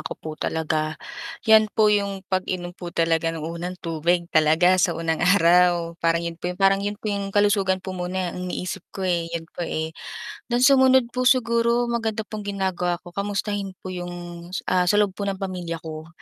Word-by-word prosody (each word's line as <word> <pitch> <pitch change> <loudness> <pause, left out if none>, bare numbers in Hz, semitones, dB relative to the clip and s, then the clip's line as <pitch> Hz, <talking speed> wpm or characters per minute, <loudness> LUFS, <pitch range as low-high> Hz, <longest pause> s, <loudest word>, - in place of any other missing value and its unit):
ko - - -6
po 155 - -7
talaga, 155 0 -2 0.5
'yan 220 -1 +6
po 215 -1 +5
'yong 200 -2 -1
pag-inom 185 -2 -2
po 175 -1 -8
talaga 165 -1 +1
ng 165 -1 -4
unang 170 +2 -5
tubig 170 +2 +1
talaga 165 +4 +4
sa 175 -3 +2
unang 165 -1 -1
araw. 175 -1 +4
Parang 165 0 +1
'yon 170 0 -5
po 175 - -2
'yong 180 - -5
parang 195 0 +4
'yon 205 +1 -3
po 215 -1 -3
'yong 200 -1 -2
kalusugan 195 -2 +2
po 190 - -4
muna 180 0 -3
ang 180 0 -5
iniisip 180 +1 -4 0.2
ko, 190 - -3
eh, 170 -2 0
'yon 165 -1 -4
po, - - -9
eh. 160 -1 -3 0.6
Then 245 +1 +1
sumunod 260 -2 +5
po 250 +1 +1
siguro 235 -1 +3
maganda 225 -2 -1
pong 210 -1 -7
ginagawa 190 -3 -1
ko 175 - -11
kamustahin 200 0 -3
po 185 - -5
'yong, 175 -1 -5 0.6
ah, 180 -1 +3
sa 205 - +4
loob 205 -1 +3
po 200 +1 -5
ng 195 - -1
pamilya 180 -4 -5
ko. 155 -1 -7
185 Hz, 190 wpm, -24 LUFS, 170-205 Hz, 0.6 s, yan